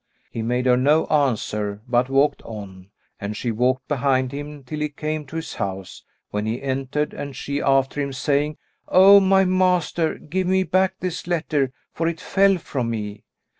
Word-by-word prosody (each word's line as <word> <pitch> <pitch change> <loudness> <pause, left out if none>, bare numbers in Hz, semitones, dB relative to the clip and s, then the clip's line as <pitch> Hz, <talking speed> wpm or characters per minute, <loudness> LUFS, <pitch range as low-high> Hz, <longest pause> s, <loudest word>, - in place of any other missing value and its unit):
He 115 - -4
made 125 +3 -1
her 125 -1 +4
no 150 +5 +3
answer, 105 -7 0
but 125 +1 +2
walked 135 +2 +2
on, 100 -4 -9 0.3
and 105 +1 -4
she 120 - -2
walked 125 +3 0
behind 130 -2 +1
him, 145 0 -7
till 150 +4 -6
he 150 0 -1
came 155 0 -4
to 160 - -10
his 165 - -4
house, 95 -1 -5 0.3
when 105 +1 -2
he 115 +3 -2
entered 135 +2 -2
and 140 -2 -6
she 140 +3 -3
after 135 +1 +2
him, 140 -1 -2
saying, 145 +3 0 0.3
"O 195 +2 +8
my 195 0 +4
master, 180 -3 +1
give 185 +4 -3
me 190 +1 +3
back 185 0 +1
this 180 -2 -4
letter, 155 -6 0 0.2
for 165 - -1
it 165 -1 -2
fell 195 0 +3
from 130 -7 -3
me." 105 -2 -5
140 Hz, 175 wpm, -22 LUFS, 125-160 Hz, 0.3 s, O